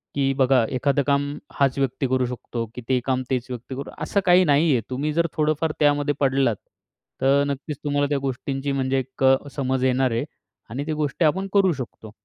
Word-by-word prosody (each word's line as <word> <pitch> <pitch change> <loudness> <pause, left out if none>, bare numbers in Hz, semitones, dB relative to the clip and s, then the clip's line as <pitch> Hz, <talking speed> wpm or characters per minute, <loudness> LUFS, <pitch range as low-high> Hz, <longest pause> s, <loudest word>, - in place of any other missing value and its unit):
की 135 -1 +1
बघा, 130 -2 +4
एखादं 140 +2 +1
काम 140 0 +2 0.3
हाच 135 -2 +2
व्यक्ती 135 0 0
करू 130 0 +1
शकतो, 120 -1 -5
की 125 - -6
ते 130 -1 +3
काम 130 -1 +1
तेच 125 -1 -1
व्यक्ती 125 +1 -6
करू. 140 +1 -6
असं 200 - +1
काही 180 0 +6
नाहीये. 145 -4 +3
तुम्ही 140 +4 -2
जर 170 +2 +2
थोडंफार 155 +1 +1
त्यामध्ये 145 0 +3
पडलात, 135 -4 +2 0.7
तर 140 +1 +4
नक्कीच 140 +1 -4
तुम्हाला 145 -1 +1
त्या 145 - +1
गोष्टींची 135 +1 -3
म्हणजे 135 0 0
एक 130 +1 -6 0.3
समज 130 -2 -1
येणार 130 0 +2
आहे 115 +1 -1 0.4
आणि 135 +6 -4
ती 155 - -1
गोष्टी 150 +2 0
आपण 190 +6 +1
करू 195 -3 +4
शकतो. 120 -5 -8
135 Hz, 185 wpm, -23 LUFS, 130-145 Hz, 0.7 s, काही